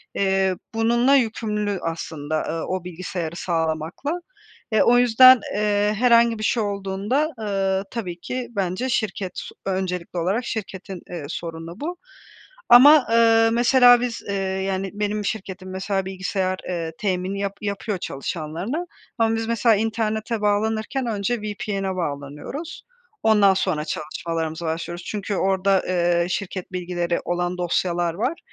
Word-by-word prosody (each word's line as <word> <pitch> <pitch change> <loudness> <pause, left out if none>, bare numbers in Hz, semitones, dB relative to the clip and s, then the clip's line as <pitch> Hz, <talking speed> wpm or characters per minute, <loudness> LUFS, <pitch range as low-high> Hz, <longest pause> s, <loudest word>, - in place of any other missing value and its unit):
eee, 190 -1 +2 0.2
bununla 235 +4 +3
yükümlü 210 -5 0
aslında, 155 -2 -3
ııı, 165 0 -3
o 185 -1 -3
bilgisayarı 175 -1 -5
sağlamakla. 165 - -2 0.5
E, 220 - +4
o 245 0 +5
yüzden, 245 +1 +8 0.2
eee, 210 0 +2
herhangi 235 -1 +4
bir 215 - -4
şey 225 +1 +1
olduğunda, 200 +8 -1
ııı, 195 -2 0
tabii 180 -8 -5
ki 255 +6 -4
bence 195 +3 -2
şirket, 200 -5 -2 0.3
öncelikli 185 -2 -3
olarak 195 +8 0
şirketin, 195 -3 -5
eee, 170 -5 -6
sorunu 165 +2 -6
bu. 340 +4 -4 0.7
Ama, 280 +4 +9
ııı, 225 0 +5
mesela 245 +1 +6
biz, 245 -2 -3
eee, 200 - -1
yani, 190 0 -2
benim 210 0 -2
şirketim 190 -2 -5
mesela 195 0 -2
bilgisayar, 190 0 -2
ııı, 165 -2 -3
temini 190 -1 -1
yap 200 0 -3
yapıyor 200 0 -2
çalışanlarına 170 - -4 0.3
ama 225 0 +2
biz 225 0 -2
mesela 230 -1 +3
internete 220 +1 -1
bağlanırken 220 +5 0
önce 215 +2 -1
VPN'e 200 -2 -3
bağlanıyoruz, 150 - -5 0.4
ondan 210 -3 +5
sonra 155 -5 -1
çalışmalarımıza 160 +1 -4
başlıyoruz. 170 +2 -4
Çünkü 205 -1 -3
orada, 190 0 +2
eee, 175 -1 +2
şirket 185 0 -4
bilgileri 175 -1 -2
olan 175 +1 -1
dosyalar 175 -1 0
var, 250 - -2
195 Hz, 130 wpm, -23 LUFS, 180-225 Hz, 0.7 s, Ama